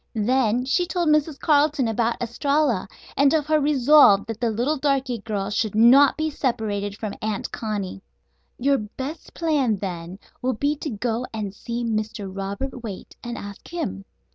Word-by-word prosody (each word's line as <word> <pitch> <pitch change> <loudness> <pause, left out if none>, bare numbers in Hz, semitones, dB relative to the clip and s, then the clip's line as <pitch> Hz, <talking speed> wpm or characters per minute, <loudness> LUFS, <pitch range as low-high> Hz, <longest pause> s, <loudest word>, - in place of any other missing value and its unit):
Then 245 +2 +2
she 350 +7 +1
told 345 -1 0
Mrs. 300 -1 +2
Carleton 290 -3 +3
about 230 +1 0
Estralla, 260 -1 0 0.3
and 280 0 +4
of 305 -2 +1
her 310 0 +3
resolve 285 -7 +5
that 225 +1 -6
the 235 - +2
little 245 +8 0
darky 265 -4 0
girl 205 -1 -3
should 210 0 -1
not 255 +5 +6
be 310 0 -1
separated 210 -7 -2
from 215 -3 -4
Aunt 215 -2 -3
Connie. 205 -4 -4 0.6
"Your 275 +2 +2
best 265 +9 -7
plan, 295 -9 +1
then, 180 -2 -5 0.2
will 255 +1 0
be 285 +6 0
to 305 - -4
go 235 +2 -2
and 205 -3 -4
see 235 +3 -4
Mr. 215 -3 -3
Robert 200 +7 -4
Waite 210 -5 -8
and 240 -1 -5
ask 200 0 -9
him. 320 - -4
240 Hz, 165 wpm, -23 LUFS, 210-285 Hz, 0.6 s, not